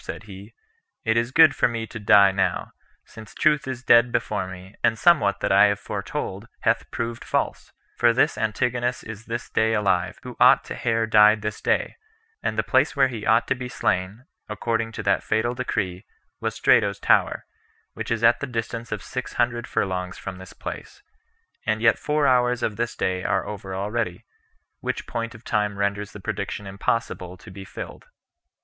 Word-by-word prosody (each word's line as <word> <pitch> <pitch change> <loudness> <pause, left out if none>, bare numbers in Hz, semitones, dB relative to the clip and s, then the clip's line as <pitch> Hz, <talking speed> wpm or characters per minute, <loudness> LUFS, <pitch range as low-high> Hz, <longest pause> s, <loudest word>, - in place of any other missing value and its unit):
said - - -7
he, 100 +1 -11 0.5
"it 110 0 +2
is 115 +1 +1
good 160 +4 +6
for - - +3
me 115 -2 -3
to 115 +1 -8
die 100 -1 +6
now, 95 -2 -1 0.3
since 110 -2 -13
truth 150 -3 +2
is 125 -2 -5
dead 120 0 +5
before 105 -5 -1
me, 95 +1 -10
and 115 -2 +3
somewhat 145 -13 +3
that - - 0
I 100 +2 +7
have 100 0 +1
foretold 100 +1 -5
hath 115 0 +1
proved 115 0 -4
false; - - -2 0.3
for 120 -1 +5
this 140 +6 +2
Antigonus 120 +3 -1
is 115 0 -9
this 120 +1 -4
day 110 0 +2
alive, 95 -4 0
who - - -8
ought - - +6
to - - -7
have 115 -1 0
died 105 0 +6
this 105 -1 -4
day; - - 0 0.4
and 110 - -2
the 110 - +2
place 130 +6 +2
where 135 -2 +4
he 115 -4 -6
ought 115 +2 +4
to - - +4
be 125 -1 -6
slain, 100 +3 -1 0.2
according 115 +2 -2
to - - -5
that - - +2
fatal 110 +2 0
decree, 95 -7 -3 0.4
was - - -3
Strato's - - +3
Tower, - - +2 0.5
which - - -6
is 115 0 -1
at 115 +1 +5
the 140 - -4
distance 115 -1 -4
of 105 -2 -4
six 130 0 -5
hundred 120 0 0
furlongs 90 -1 -2
from 95 -1 -7
this 95 -1 -11
place; - - -8 0.6
and 110 0 +1
yet 115 0 +3
four 150 -1 0
hours 125 -2 +3
of 105 - -1
this 120 +2 -2
day 95 0 -1
are - - 0
over 95 -2 -6
already; 105 +4 -3 0.5
which - - -3
point 115 0 -4
of 115 - -14
time 105 -3 -1
renders 100 +1 -1
the 105 - -10
prediction 100 +1 -4
impossible 95 -2 -3
to 90 - -13
be 95 +1 -9
fill - - -7
filled." - - -24
110 Hz, 190 wpm, -24 LUFS, 100-120 Hz, 0.6 s, I